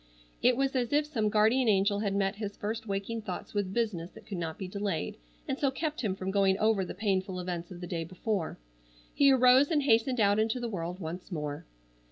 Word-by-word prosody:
It 245 0 +4
was 275 0 0
as 245 -2 0
if 295 +1 +3
some 225 -8 0
guardian 220 +4 +3
angel 200 0 +3
had 200 -2 -1
met 195 0 0
his 205 -2 -5
first 220 +2 -4
waking 200 +3 -3
thoughts 190 -4 -6
with 200 -3 -1
business 195 -7 -1
that - - -14
could 195 -4 -5
not 160 -2 -4
be 190 - -5
delayed 195 - -3 0.3
and 270 - -2
so 280 - +3
kept 305 +3 -3
him 200 -6 -1
from 190 0 -3
going 195 -1 +3
over 215 -2 +2
the 180 - -6
painful 190 -2 -1
events 175 -1 -4
of 180 -1 -9
the - - -4
day 170 -2 -2
before. 185 +1 -3 0.6
He 280 -1 +5
arose 255 +2 +6
and 300 -4 +2
hastened 240 0 +3
out 205 0 +4
into 220 +3 +1
the 240 - -3
world 180 -2 -4
once 180 +2 -6
more. 150 -3 -4
205 Hz, 220 wpm, -30 LUFS, 185-235 Hz, 0.6 s, arose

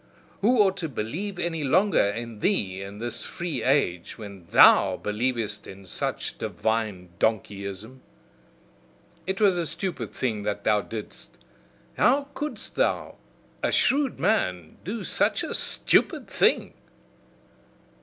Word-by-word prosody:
Who 240 +5 +4
ought 195 -3 +4
to 165 -3 -3
believe 165 - -4
any 165 -3 -2
longer 185 +9 +3
in 115 +2 -3
thee 95 - 0
in 100 +1 -8
this 120 +1 -4
free 170 -2 -4
age, 125 - +1
when 100 -5 -10
THOU - - +6
believest 110 -1 -2
in 95 0 -11
such 90 - -4
divine 110 -5 -2
donkeyism? 105 +2 -2 1.3
It 190 +1 -2
was 195 -4 +4
a 170 - -1
stupid 190 +2 -3
thing 110 -5 -2
that 105 0 -3
thou 105 -1 +3
didst; 110 0 -8 0.6
how 280 +3 +3
couldst 300 0 -5
thou, - - 0 0.4
a - - +1
shrewd 275 0 +2
man, 90 - 0
do 205 +4 -4
such - - +1
a - - -4
stupid - - +2
thing!" - - +2
120 Hz, 125 wpm, -26 LUFS, -, 1.3 s, THOU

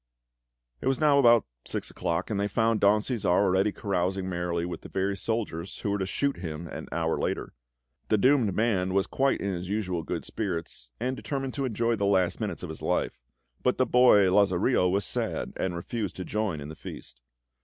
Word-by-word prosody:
It - - -2
was 135 -1 +2
now 150 -2 +5
about 120 -4 +6 0.2
six - - -3
o'clock; 85 +5 -2
and 100 - 0
they 100 - +1
found 115 0 +1
Don 105 +1 +4
Cæsar 115 -1 -3
already 95 +2 +3
carousing 95 -1 -1
merrily 85 -1 -2
with 90 - -5
the - - -10
very 95 +1 -1
soldiers 100 -4 -3
who 100 - -1
were 100 - 0
to 95 - -1
shoot 140 +7 -1
him 85 -1 -5
an - - -7
hour - - 0
later. - - -2 0.5
The 110 - +3
doomed 125 -4 +3
man 95 -5 +1
was 100 - +3
quite 135 0 +1
in 100 -1 -1
his 90 +1 -5
usual 95 -5 -1
good - - -4
spirits, 85 - -4
and 130 +3 -1
determined 135 -1 -4
to 140 - -2
enjoy 115 -1 0
the 100 0 +1
last 95 -3 +2
minutes - - -3
of - - -5
his - - -7
life; - - -1 0.4
but 125 - +1
the 130 - +3
boy, 120 -5 +6
Lazarillo, 95 0 +3
was 100 +2 +1
sad, - - -2
and 95 -2 -2
refused 100 +4 -4
to 90 - -5
join 105 -8 -2
in 70 - -7
the 80 - -8
feast. - - -10
100 Hz, 200 wpm, -28 LUFS, 90-115 Hz, 0.5 s, about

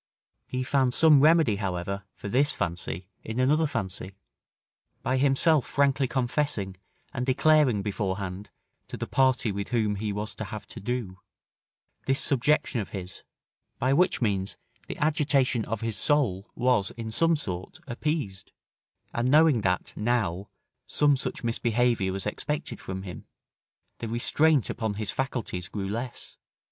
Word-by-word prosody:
He 130 0 -2
found 130 -1 +2
some 155 -4 +6
remedy, 155 -8 +5
however, 95 0 -3
for - - -7
this 135 +7 +2
fancy 85 +1 -3 0.2
in 110 +3 -4
another 150 +5 +3
fancy, 95 -6 -4 0.9
by 130 - +1
himself 140 +2 +4
frankly 140 -1 +2
confessing 120 -7 -1 0.4
and 125 - -2
declaring 130 -4 +3
beforehand 100 -1 -3 0.4
to - - -7
the - - -3
party 130 -4 +2
with 100 0 -4
whom 110 -4 0
he 105 +1 -2
was 105 +1 -4
to - - -6
have 110 -3 -7
to - - -9
do, 105 -4 -3 0.9
this 135 +1 +2
subjection 140 -2 +2
of 100 - -7
his, 95 -2 -7 0.6
by 130 +2 +2
which 175 -4 +3
means, 100 -3 -1 0.3
the - - -6
agitation 140 -6 +2
of 115 +2 -3
his 115 -2 -1
soul 120 -10 +1
was, 120 -6 +2
in 115 -1 -5
some 165 +8 +3
sort, 95 - -5
appeased; 120 -8 -3 0.6
and 120 +2 0
knowing 150 -4 +5
that, 90 -2 -1
now, 105 -5 -1 0.4
some 145 -1 +3
such 130 - -4
misbehaviour 115 -3 +1
was 95 0 -3
expected 145 +8 -3
from 95 0 -5
him, 90 -2 -9 0.7
the 115 - -4
restraint 140 +5 +2
upon 110 -3 -2
his 105 -1 -2
faculties 115 -7 -3
grew 100 -2 -4
less. 115 +5 -5
120 Hz, 145 wpm, -27 LUFS, 100-135 Hz, 0.9 s, some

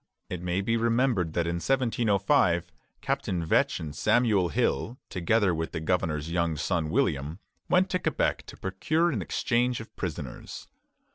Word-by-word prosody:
It 90 - -4
may 90 +2 -1
be 115 +3 +1
remembered 115 -7 +1
that 85 - 0
in 85 0 -1
1705 100 -7 +2 0.3
Captain 85 -3 -1
Vetch - - +2
and 75 -2 -6
Samuel 105 -2 +3
Hill, 80 - 0
together 95 +1 +2
with 80 0 -3
the - - -2
governor's 80 -2 -1
young 85 -2 0
son 80 +1 -1
William, 75 +2 0 0.3
went 185 +1 +3
to 185 - +1
Quebec - - -1
to - - -10
procure 155 - 0
an - - -2
exchange 125 0 0
of 110 - -11
prisoners. 75 -8 -6
90 Hz, 150 wpm, -28 LUFS, 80-115 Hz, 0.3 s, Samuel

